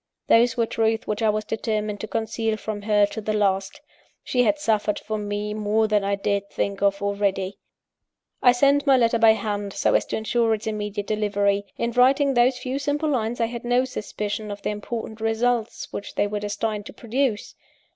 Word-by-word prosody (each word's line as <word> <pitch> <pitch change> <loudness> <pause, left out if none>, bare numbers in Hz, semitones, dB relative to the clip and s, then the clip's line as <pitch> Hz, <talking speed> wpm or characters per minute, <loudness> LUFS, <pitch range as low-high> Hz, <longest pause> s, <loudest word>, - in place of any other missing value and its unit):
Those 235 +1 +4
were 230 - +3
truths 225 0 0
which 210 +1 -3
I 220 - +3
was 215 0 -1
determined 215 -1 -2
to 220 - -5
conceal 225 0 -2
from 215 -1 -5
her, 210 0 +3
to 210 +2 -6
the 215 0 -2
last. 195 +1 0 0.4
She 250 - +1
had 300 +5 +3
suffered 215 -6 0
for 215 0 -4
me 205 0 -3
more 215 +1 +1
than 210 -1 +2
I 200 0 +1
dared 200 0 -1
think 200 -1 -2
of, 200 0 +1
already! 200 -1 -1 0.8
I 245 - +7
sent 280 +4 +3
my 270 -1 +6
letter 230 -1 +2
by 225 -1 +7
hand, 205 -2 -3
so - - +1
as - - +3
to - - -2
ensure 225 +1 +1
its 215 - -9
immediate 210 -1 -3
delivery. 205 -1 0
In 235 - -1
writing 270 +3 +4
those 245 +1 +3
few 255 +2 -3
simple 290 +2 -1
lines, 240 -3 -1
I 230 - +3
had 235 +1 -6
no 245 +1 +2
suspicion 210 -3 -4
of 205 0 -7
the - - -1
important 220 +1 -6
results 225 +1 -1
which 200 - -6
they - - +2
were 205 0 -3
destined 210 0 -3
to - - -10
produce. 240 -1 -2
215 Hz, 195 wpm, -24 LUFS, 205-235 Hz, 0.8 s, I